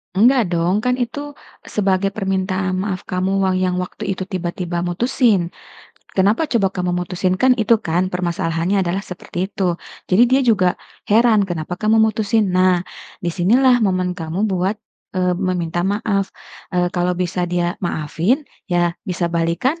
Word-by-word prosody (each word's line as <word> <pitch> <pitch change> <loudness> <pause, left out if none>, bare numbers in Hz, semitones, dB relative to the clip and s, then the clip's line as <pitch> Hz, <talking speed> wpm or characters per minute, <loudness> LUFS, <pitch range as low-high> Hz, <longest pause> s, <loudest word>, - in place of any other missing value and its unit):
Enggak 230 -1 +4
dong, 175 +5 +1
kan 250 +1 +1
itu 285 +4 -3 0.3
sebagai 195 -1 0
permintaan 190 -2 -1
maaf 190 -3 -4
kamu 185 +1 -1
wang 190 -1 +2
yang 180 -1 +1
waktu 180 - -5
itu 190 0 -4
tiba-tiba 175 -2 -3
mutusin. 205 0 +1 0.7
Kenapa 205 +11 +2
coba 230 -9 +1
kamu 180 -2 -2
mutusin, 180 +1 -1
kan 255 -1 +5
itu 225 -1 +3
kan 180 +2 -1
permasalahannya 175 +1 0
adalah 175 +3 -1
seperti 180 -1 -5
itu. 185 -4 0 0.3
Jadi 190 +6 +4
dia 260 +2 +4
juga 200 -6 +4 0.4
heran 215 -2 +4
kenapa 175 +1 -4
kamu 220 +1 +3
mutusin. 215 -2 +1
Nah, 185 -1 +3 0.4
di 170 - 0
sinilah 245 +8 +4
momen 185 -3 +1
kamu 175 +3 -3
buat, 190 0 0 0.4
eee, 180 -1 +2
meminta 175 -2 -1
maaf. 200 +1 0 0.5
Eee, 180 0 +1
kalau 180 0 0
bisa 180 0 -1
dia 175 0 0
maafin 175 - 0 0.2
ya 175 -1 +2 0.2
bisa 175 -1 -1
balikan, 170 - 0
185 Hz, 150 wpm, -19 LUFS, 175-210 Hz, 0.7 s, kan